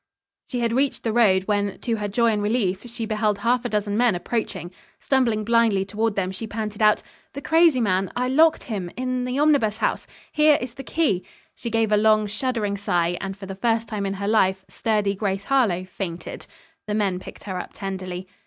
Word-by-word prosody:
She 245 Hz, -2 st, -3 dB
had 230 Hz, -1 st, +1 dB
reached 270 Hz, +2 st, 0 dB
the 225 Hz, -, -1 dB
road, 200 Hz, -5 st, +4 dB
when, 205 Hz, -1 st, -1 dB
to 230 Hz, -2 st, -1 dB
her 210 Hz, -1 st, -2 dB
joy 230 Hz, +3 st, +2 dB
and 210 Hz, -1 st, 0 dB
relief, 205 Hz, -1 st, 0 dB
she 235 Hz, -1 st, -4 dB
beheld 215 Hz, -1 st, 0 dB
half 240 Hz, +4 st, +1 dB
a -, -, -1 dB
dozen 205 Hz, -1 st, -1 dB
men 235 Hz, -3 st, +3 dB
approaching. 180 Hz, -2 st, -3 dB, 0.3 s
Stumbling 235 Hz, -6 st, +1 dB
blindly 225 Hz, -3 st, +3 dB
toward 220 Hz, +1 st, -1 dB
them, 185 Hz, -1 st, -1 dB
she 205 Hz, +4 st, -6 dB
panted 215 Hz, 0 st, -5 dB
out: 210 Hz, 0 st, +4 dB, 0.3 s
"The 280 Hz, -, -6 dB
crazy 325 Hz, -4 st, +4 dB
man 190 Hz, -4 st, +1 dB
I 250 Hz, +1 st, 0 dB
locked 315 Hz, +5 st, +4 dB
him 195 Hz, -7 st, -4 dB
in 255 Hz, 0 st, -1 dB
the 250 Hz, +1 st, -2 dB
Omnibus 285 Hz, -8 st, +3 dB
House. -, -, -1 dB, 0.2 s
Here 300 Hz, -1 st, +5 dB
is 250 Hz, -1 st, -6 dB
the 270 Hz, -, -8 dB
key." 260 Hz, -, 0 dB, 0.3 s
She 235 Hz, -, -6 dB
gave 225 Hz, -1 st, +1 dB
a 210 Hz, -, +5 dB
long, 215 Hz, 0 st, +4 dB
shuddering 210 Hz, -1 st, -2 dB
sigh, 175 Hz, -3 st, 0 dB
and 195 Hz, 0 st, -5 dB
for 200 Hz, -, -9 dB
the 195 Hz, -, -6 dB
first 225 Hz, +3 st, 0 dB
time 210 Hz, -2 st, -3 dB
in 195 Hz, -, -2 dB
her 200 Hz, +1 st, -4 dB
life 190 Hz, -3 st, +2 dB
sturdy 210 Hz, -3 st, 0 dB
Grace 195 Hz, -1 st, -2 dB
Harlowe 205 Hz, -9 st, +1 dB
fainted. 180 Hz, -2 st, -6 dB, 0.4 s
The 210 Hz, -, -1 dB
men 195 Hz, -4 st, 0 dB
picked -, -, -11 dB
her 190 Hz, -3 st, -4 dB
up -, -, -8 dB
tenderly. 185 Hz, -2 st, -5 dB
215 Hz, 205 wpm, -23 LUFS, 195-235 Hz, 0.4 s, Here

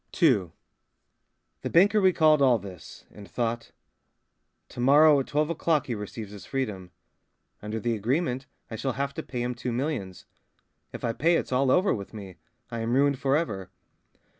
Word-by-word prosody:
II 125 Hz, -, +4 dB, 1.1 s
The -, -, -3 dB
banker 205 Hz, +5 st, +4 dB
recalled 155 Hz, -5 st, +4 dB
all 130 Hz, -3 st, +5 dB
this, 95 Hz, -5 st, -11 dB
and 105 Hz, -1 st, -13 dB
thought: 120 Hz, -1 st, -3 dB, 1.0 s
"To -, -, -11 dB
morrow 145 Hz, +3 st, +6 dB
at 135 Hz, -, -3 dB
twelve 150 Hz, +2 st, 0 dB
o'clock 165 Hz, -2 st, +1 dB
he 125 Hz, -, -3 dB
receives 105 Hz, 0 st, -7 dB
his 100 Hz, -3 st, -10 dB
freedom. 105 Hz, -10 st, -4 dB, 0.7 s
Under 105 Hz, +1 st, -4 dB
the 120 Hz, +1 st, -1 dB
agreement, 130 Hz, -, -1 dB, 0.2 s
I 110 Hz, -, -4 dB
shall 130 Hz, +3 st, -2 dB
have 140 Hz, +1 st, -3 dB
to -, -, -5 dB
pay 120 Hz, -1 st, -5 dB
him 125 Hz, 0 st, -2 dB
two 125 Hz, +1 st, -4 dB
millions. 120 Hz, -, -3 dB, 0.7 s
If -, -, -9 dB
I 115 Hz, -, 0 dB
pay, 165 Hz, +8 st, +2 dB
it's -, -, -2 dB
all 130 Hz, +1 st, +2 dB
over 185 Hz, +8 st, +3 dB
with 100 Hz, +1 st, -7 dB
me. 95 Hz, -4 st, -9 dB, 0.3 s
I 115 Hz, -, -4 dB
am 115 Hz, +1 st, -1 dB
ruined 140 Hz, -1 st, +2 dB
for 135 Hz, +1 st, +2 dB
ever 100 Hz, -, -3 dB
125 Hz, 170 wpm, -27 LUFS, 110-145 Hz, 1.1 s, morrow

